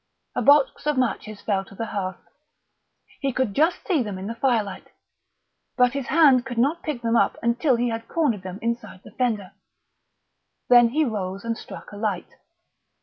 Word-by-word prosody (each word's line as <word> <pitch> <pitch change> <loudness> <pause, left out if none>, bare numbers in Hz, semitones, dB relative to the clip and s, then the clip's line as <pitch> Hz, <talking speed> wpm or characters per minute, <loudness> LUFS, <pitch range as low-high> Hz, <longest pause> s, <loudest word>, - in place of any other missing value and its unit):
A - - 0
box 285 0 +4
of 300 -2 +1
matches 215 -4 -2
fell 195 -2 0
to 195 - -15
the 225 - -3
hearth. 190 -4 -5 0.9
He 275 -1 -1
could 255 -5 -1
just 320 - +1
see 345 -9 +2
them 210 -5 -4
in 190 - -6
the 225 - -3
firelight, 230 -6 -1 0.9
but 250 -1 +4
his 275 -3 -3
hand 275 -5 +5
could 245 -2 -7
not 285 +8 +2
pick 275 -6 -4
them 230 0 +1
up - - +2
until 240 +3 +2
he 240 +1 0
had 225 0 -5
cornered 280 - 0
them 185 0 -7
inside 230 -5 -3
the - - -13
fender. 220 -7 -1 1.2
Then 240 -1 +7
he 305 +5 +1
rose 195 -4 -4
and 230 0 -1
struck - - -10
a 205 - -9
light. 205 -4 -3
235 Hz, 180 wpm, -24 LUFS, 205-265 Hz, 1.2 s, Then